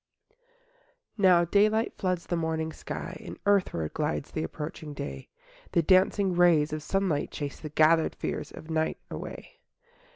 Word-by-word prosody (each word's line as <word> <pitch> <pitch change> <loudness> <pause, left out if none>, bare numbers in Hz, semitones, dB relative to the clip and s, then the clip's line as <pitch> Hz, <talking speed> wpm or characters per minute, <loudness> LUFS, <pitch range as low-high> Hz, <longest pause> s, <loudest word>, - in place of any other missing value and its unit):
I - - -37 0.8
Now 180 -3 +6
daylight 215 +5 +2
floods 185 -2 -2
the 175 - -1
morning 160 -1 -2
sky, - - -6
And - - -8
earthward 185 - +1
glides 150 -1 -2
the 155 - -2
approaching 150 -1 -6
day, 70 - -6 0.4
The 170 - +3
dancing 190 +2 +4
rays 165 -4 +4
of 155 - -3
sunlight 175 -2 0
chase 145 -2 -5
The 155 - -6
gathered 155 +2 +3
fears - - -4
of 155 - -10
night 160 0 0
away. - - -8
160 Hz, 150 wpm, -28 LUFS, 155-185 Hz, 0.8 s, Now